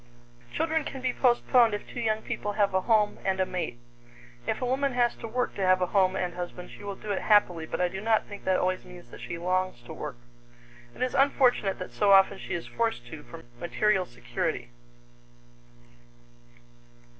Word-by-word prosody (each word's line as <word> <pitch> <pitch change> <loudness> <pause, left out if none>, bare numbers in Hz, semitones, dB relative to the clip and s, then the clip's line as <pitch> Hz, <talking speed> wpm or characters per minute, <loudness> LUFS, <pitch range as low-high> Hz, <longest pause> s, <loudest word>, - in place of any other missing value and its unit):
Children 320 - 0
can 270 - -6
be 255 -1 0
postponed 240 -2 +4
if 205 - -7
two - - -7
young 220 -2 0
people 205 - -3
have 200 -2 +2
a 190 - +2
home 210 -1 +2
and 190 -1 0
a 190 - +3
mate. 175 -10 -4 0.7
If 220 - 0
a 255 - -1
woman 270 +2 0
has 240 -1 +2
to 230 - -6
work 250 +3 -1
to - - -5
have 185 0 +4
a 180 - +2
home 190 -2 +4
and 180 -2 -2
husband, 180 0 -6
she - - -12
will 200 -1 -4
do 210 +1 -6
it 195 - -1
happily, 180 -6 +3
but - - -4
I 180 - +3
do 190 +2 -6
not 220 0 +2
think 205 -1 -10
that 185 -1 +3
always 185 0 0
means 175 -9 -13
that - - -11
she 170 - -5
longs 185 -6 -1
to - - -9
work. 145 -5 -6 0.8
It - - -2
is 255 - -1
unfortunate 255 -7 +3
that - - -7
so 200 +12 +3
often 195 0 +5
she - - -4
is 170 - -4
forced 225 - -2
to 160 - -7
for 120 - -11 0.2
material 190 +3 +1
security. 120 0 -3
195 Hz, 200 wpm, -28 LUFS, 180-230 Hz, 0.8 s, often